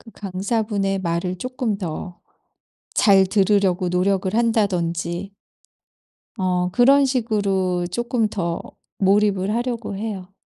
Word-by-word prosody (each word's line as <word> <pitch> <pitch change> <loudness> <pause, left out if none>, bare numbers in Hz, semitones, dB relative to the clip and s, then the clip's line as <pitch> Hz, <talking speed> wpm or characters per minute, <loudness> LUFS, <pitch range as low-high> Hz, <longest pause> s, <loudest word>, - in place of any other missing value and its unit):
그 225 - -15
강사분의 200 0 -2
말을 175 +1 -2
쪼끔 250 -2 -2
더 175 -1 -6 0.8
잘 195 -3 +5
들으려고 195 -2 +2
노력을 185 +1 0
한다든지 190 -5 0 1.1
어 180 -1 0
그런 275 +6 +5
식으로 200 -8 0
쪼끔 240 +2 0
더 170 -5 -3 0.4
몰입을 195 0 +2
하려고 235 -4 -3
해요. 195 -3 -5
195 Hz, 225 characters per minute, -22 LUFS, 180-220 Hz, 1.1 s, 잘